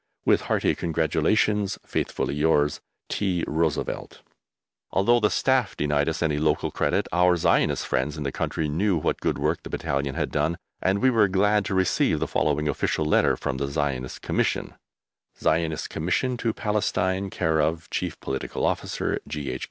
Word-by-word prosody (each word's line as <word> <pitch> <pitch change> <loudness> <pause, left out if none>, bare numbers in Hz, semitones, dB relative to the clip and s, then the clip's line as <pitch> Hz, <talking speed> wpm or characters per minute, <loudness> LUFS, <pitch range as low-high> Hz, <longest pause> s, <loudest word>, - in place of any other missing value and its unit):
With - - +4
hearty - - +1
congratulations, 85 +6 +1
Faithfully - - -2
yours, 75 -1 +2 0.3
T. 95 -4 -1
ROOSEVELT. 80 -1 -2 0.7
Although 120 +5 +3
the 105 -2 +3
Staff 130 -6 +1
denied 75 +1 +1
us 80 - -2
any 75 -2 +1
local 75 0 +1
credit, - - 0
our 90 +1 +4
Zionist - - +2
friends 65 +4 -1
in 75 - -4
the 70 - -2
country 80 +3 -2
knew 90 +5 +1
what 75 - -1
good - - 0
work - - 0
the - - -9
battalion 70 0 -2
had - - -2
done, 85 +1 0 0.2
and 95 +4 +1
we 130 - +5
were 110 -4 +4
glad 100 +2 +2
to 100 - -2
receive 95 -1 +2
the - - -1
following 75 0 0
official 75 +1 0
letter 75 - +3
from 65 - -3
the 70 +1 -2
Zionist 70 -3 -3
Commission: - - -1 0.7
ZIONIST 80 -1 0
COMMISSION 90 +11 0
TO 115 -1 0
PALESTINE, 100 -3 -1
c/o 80 -1 +1
Chief - - -3
Political 65 0 -3
Officer, - - -1
G.H. 70 -4 -4
80 Hz, 160 wpm, -25 LUFS, 75-95 Hz, 0.7 s, we